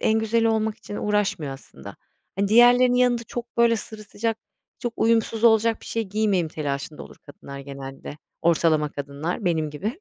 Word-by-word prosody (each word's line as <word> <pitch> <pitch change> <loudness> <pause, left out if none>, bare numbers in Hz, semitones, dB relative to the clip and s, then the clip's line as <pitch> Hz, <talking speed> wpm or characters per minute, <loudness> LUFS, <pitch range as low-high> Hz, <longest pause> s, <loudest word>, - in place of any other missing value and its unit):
en 220 0 +2
güzeli 225 +1 +1
olmak 220 -1 0
için 205 - -8
uğraşmıyor 205 -9 -1
aslında. 130 - -12 0.4
Hani, 200 0 +1
diğerlerinin 245 +2 +6
yanında 245 -1 +2
çok 240 +1 -7
böyle 235 -1 +4
sırıtacak, 220 0 -4 0.4
çok 240 -3 -3
uyumsuz 225 0 +1
olacak 225 0 +4
bir - - -13
şey 230 - -1
giymeyeyim 200 -4 0
telaşında 145 -1 -4
olur - - -13
kadınlar 140 -1 -10
genelde. 140 0 -8 0.3
Ortalama 160 -2 +3
kadınlar 145 +8 -4
benim 160 -4 0
gibi. 215 - -5
210 Hz, 155 wpm, -24 LUFS, 155-230 Hz, 0.4 s, diğerlerinin